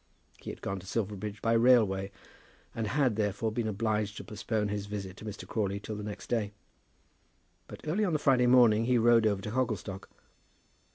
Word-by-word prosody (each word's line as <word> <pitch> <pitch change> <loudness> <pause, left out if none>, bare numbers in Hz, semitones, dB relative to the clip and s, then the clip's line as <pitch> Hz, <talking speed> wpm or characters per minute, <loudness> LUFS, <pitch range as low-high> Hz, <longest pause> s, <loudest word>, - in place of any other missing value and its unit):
He - - -8
had - - -9
gone 95 0 -3
to 95 - -13
Silverbridge 105 0 -3
by 115 - +2
railway, 110 -5 +4 0.6
and 115 -2 -2
had, 130 -1 +1
therefore, 105 +1 0
been 110 0 -2
obliged 105 -1 -1
to - - -6
postpone 110 0 -2
his 100 0 -3
visit 100 -2 -5
to - - -10
Mr. 105 -1 -7
Crawley 100 -3 -1
till 105 +1 -6
the 105 - -5
next 105 -1 -6
day; 105 -4 -1 1.1
but - - -10
early 185 +8 +1
on 185 -5 +1
the - - +3
Friday 130 -4 +3
morning 120 -3 +5
he 125 0 +3
rode 115 -1 +5
over 100 -2 -1
to 105 - -4
Hogglestock. 110 -6 -3
110 Hz, 185 wpm, -30 LUFS, 100-120 Hz, 1.1 s, morning